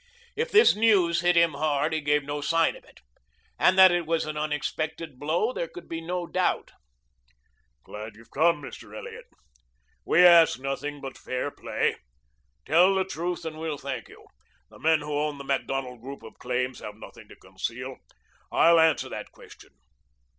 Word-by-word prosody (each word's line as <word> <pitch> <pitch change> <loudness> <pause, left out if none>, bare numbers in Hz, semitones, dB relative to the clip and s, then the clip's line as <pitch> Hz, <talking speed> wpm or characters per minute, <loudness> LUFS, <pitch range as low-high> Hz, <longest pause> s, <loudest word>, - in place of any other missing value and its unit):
If 465 +3 -1
this 435 0 +6
news 195 -6 +3
hit 175 0 +3
him 170 -2 +4
hard 145 +1 0
he 155 - -1
gave 145 0 +1
no 145 +1 -4
sign 165 +2 +2
of - - -15
it. - - -21 0.6
And 185 - +4
that 190 -1 +9
it 175 -2 -1
was 165 0 0
an 155 0 -5
unexpected 155 0 -4
blow 170 - 0
there 170 - -3
could 175 +1 -12
be 165 0 -5
no 175 +1 -3
doubt. 180 +1 -1 1.1
"Glad 105 0 -9
you've 115 +2 -18
come, 160 0 +2
Mr. - - -10
Elliot. - - -9 0.8
We 180 +2 +5
ask 170 -5 +7
nothing 140 +2 -4
but 135 -1 -8
fair 130 +3 -3
play. - - -2 0.7
Tell 180 +4 +4
the 190 -1 +1
truth, 175 -1 -4
and 155 -1 -6
we'll 160 -2 -3
thank 135 -4 -6
you. - - -16 0.5
The - - -16
men 160 -1 +3
who 150 0 -5
own 145 0 -1
the 140 - -8
Macdonald 135 -2 -3
group 135 0 -9
of 110 - -13
claims 125 +1 -2
have 105 - -8
nothing 110 - -13
to - - -13
conceal. - - -6 0.5
I'll 170 0 +5
answer 160 -2 +3
that - - -7
question. - - -16
155 Hz, 175 wpm, -26 LUFS, 140-170 Hz, 1.1 s, that